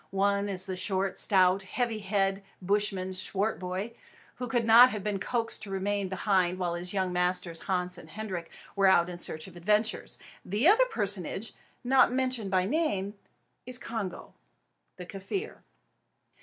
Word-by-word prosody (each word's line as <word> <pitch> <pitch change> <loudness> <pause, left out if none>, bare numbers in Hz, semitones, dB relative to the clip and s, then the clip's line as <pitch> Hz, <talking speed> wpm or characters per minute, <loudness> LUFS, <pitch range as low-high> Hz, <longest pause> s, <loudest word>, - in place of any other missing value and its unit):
One 200 +1 +1
is 190 -1 +3
the 190 - -4
short, 190 +1 -2
stout, 190 -1 +4
heavy 225 +3 -2
headed 195 -1 0 0.2
Bushman, 195 -1 -1
Swartboy, 190 +1 -2 0.5
who 250 - -4
could 235 -1 0
not 235 +3 +9
have 210 -4 -5
been 205 -2 -2
coaxed 230 +1 -1
to 210 - -8
remain 195 0 -1
behind 185 -2 +1
while 175 -2 -1
his 175 +1 -4
young 190 -2 -1
masters 180 -1 -1
Hans 180 -1 -2
and 160 - -13
Hendrik 185 -2 -5 0.3
were 195 -1 +4
out 175 -2 +4
in 175 - -8
search 155 -2 -1
of 190 - -13
adventures. 210 +5 0 0.3
The 210 - +1
other 450 +6 +6
personage 205 - -2 0.3
not 260 0 +4
mentioned 255 -5 -1
by 185 -1 +2
name 205 - -1 0.5
is 250 -1 -3
Congo, 220 -8 -6 0.6
the 180 - -9
Kaffir. 200 - -5
195 Hz, 155 wpm, -29 LUFS, 185-220 Hz, 0.6 s, not